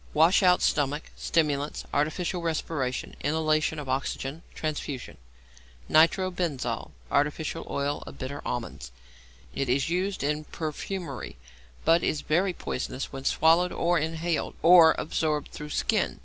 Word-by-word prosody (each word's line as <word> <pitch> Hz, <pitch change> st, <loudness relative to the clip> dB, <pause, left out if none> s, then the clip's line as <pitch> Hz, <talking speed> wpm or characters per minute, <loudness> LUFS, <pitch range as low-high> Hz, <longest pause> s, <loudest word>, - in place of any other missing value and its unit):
_ -, -, -22 dB
Wash 165 Hz, +6 st, +5 dB
out 180 Hz, -2 st, +4 dB
stomach; 145 Hz, +1 st, 0 dB
stimulants, 150 Hz, -3 st, 0 dB
artificial 170 Hz, +4 st, 0 dB
respiration, 155 Hz, -5 st, -2 dB
inhalation 155 Hz, +1 st, +1 dB
of 150 Hz, -2 st, -6 dB
oxygen, 135 Hz, +3 st, -2 dB
transfusion. 150 Hz, -4 st, -4 dB, 0.7 s
=Nitro 175 Hz, +4 st, +4 dB
benzol= 140 Hz, -, -2 dB, 0.2 s
(Artificial 150 Hz, +3 st, 0 dB
Oil 140 Hz, +1 st, -1 dB
of -, -, -9 dB
Bitter 140 Hz, +2 st, -5 dB
Almonds). 115 Hz, -, -5 dB, 0.6 s
It 135 Hz, -2 st, -2 dB
is 135 Hz, +4 st, +1 dB
used 190 Hz, +1 st, -1 dB
in 150 Hz, +1 st, -1 dB
perfumery, 155 Hz, -, -5 dB, 0.5 s
but 165 Hz, +1 st, +5 dB
is 150 Hz, -, 0 dB
very 180 Hz, +5 st, +1 dB
poisonous 135 Hz, -6 st, -4 dB
when 135 Hz, 0 st, -7 dB
swallowed, 165 Hz, +5 st, +4 dB
or 175 Hz, 0 st, +1 dB
inhaled, 160 Hz, +2 st, -2 dB
or 165 Hz, -1 st, +8 dB
absorbed 155 Hz, -2 st, -1 dB
through 150 Hz, 0 st, -7 dB
skin. -, -, 0 dB
155 Hz, 130 wpm, -27 LUFS, 140-165 Hz, 0.7 s, or